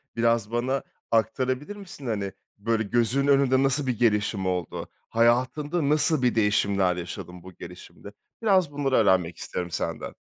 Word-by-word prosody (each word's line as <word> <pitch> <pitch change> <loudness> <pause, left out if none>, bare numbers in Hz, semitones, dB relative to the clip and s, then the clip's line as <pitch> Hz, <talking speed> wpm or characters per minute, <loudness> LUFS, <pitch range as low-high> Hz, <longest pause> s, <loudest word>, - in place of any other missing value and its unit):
Biraz 115 -2 +1
bana 125 +3 -1 0.3
aktarabilir 130 - 0
misin? 195 -8 -11
Hani, 100 -4 -2 0.3
böyle, 110 +2 0
gözünün 120 +5 +1
önünde 135 -1 +4
nasıl 135 +1 +1
bir 120 -3 -1
gelişim 105 -4 +1
oldu? 90 -2 -3 0.2
Hayatında 130 +7 +1
nasıl 155 -1 +2
bir 125 -2 +2
değişimler 100 -4 +2
yaşadın 90 0 -7
bu 95 - -11
gelişimde? 90 +4 -11 0.3
Biraz 190 -8 +3
bunları 140 -2 0
öğrenmek 95 -6 +3
isterim 90 -1 -5
senden. - - -4
115 Hz, 140 wpm, -26 LUFS, 100-140 Hz, 0.3 s, önünde